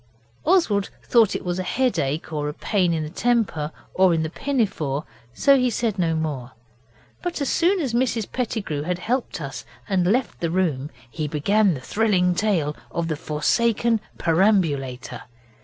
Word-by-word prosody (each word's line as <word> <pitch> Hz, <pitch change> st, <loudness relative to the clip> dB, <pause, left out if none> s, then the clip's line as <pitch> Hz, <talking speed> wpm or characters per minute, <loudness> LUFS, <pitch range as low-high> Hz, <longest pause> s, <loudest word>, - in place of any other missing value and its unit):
Oswald 280 Hz, -, +3 dB
thought 230 Hz, -4 st, +4 dB
it -, -, -4 dB
was 175 Hz, 0 st, -1 dB
headache, 175 Hz, -, -1 dB
or 150 Hz, -1 st, -1 dB
pain 185 Hz, +1 st, +1 dB
in 160 Hz, -2 st, 0 dB
the 150 Hz, -, -5 dB
temper, 200 Hz, -9 st, 0 dB, 0.2 s
or 185 Hz, -2 st, +4 dB
in 160 Hz, -, 0 dB
the 160 Hz, -, -3 dB
pinafore, 185 Hz, -, -1 dB, 0.3 s
so 275 Hz, -, +4 dB
he 250 Hz, -2 st, +3 dB
said 220 Hz, -3 st, -1 dB
no 165 Hz, -2 st, +1 dB
more, 145 Hz, -6 st, -3 dB, 0.7 s
but 355 Hz, -2 st, -3 dB
as 280 Hz, -, -1 dB
soon 365 Hz, +3 st, +2 dB
as 270 Hz, -8 st, -2 dB
Mrs 235 Hz, -3 st, +1 dB
Pettigrew 215 Hz, -, -2 dB
had 175 Hz, +4 st, -2 dB
helped 240 Hz, +4 st, -2 dB
us 140 Hz, -3 st, -6 dB, 0.2 s
and 185 Hz, -3 st, +1 dB
left 250 Hz, +2 st, 0 dB
the 170 Hz, -, -1 dB
room 160 Hz, -6 st, 0 dB, 0.2 s
he 150 Hz, +6 st, -4 dB
began 190 Hz, +6 st, +2 dB
the 130 Hz, -, -7 dB
thrilling 190 Hz, -, +2 dB
tale 175 Hz, -7 st, 0 dB
of 170 Hz, -1 st, -2 dB
the 155 Hz, -, 0 dB
forsaken 225 Hz, +9 st, +1 dB, 0.2 s
perambulator. 165 Hz, -, +1 dB
180 Hz, 155 wpm, -23 LUFS, 155-230 Hz, 0.7 s, thought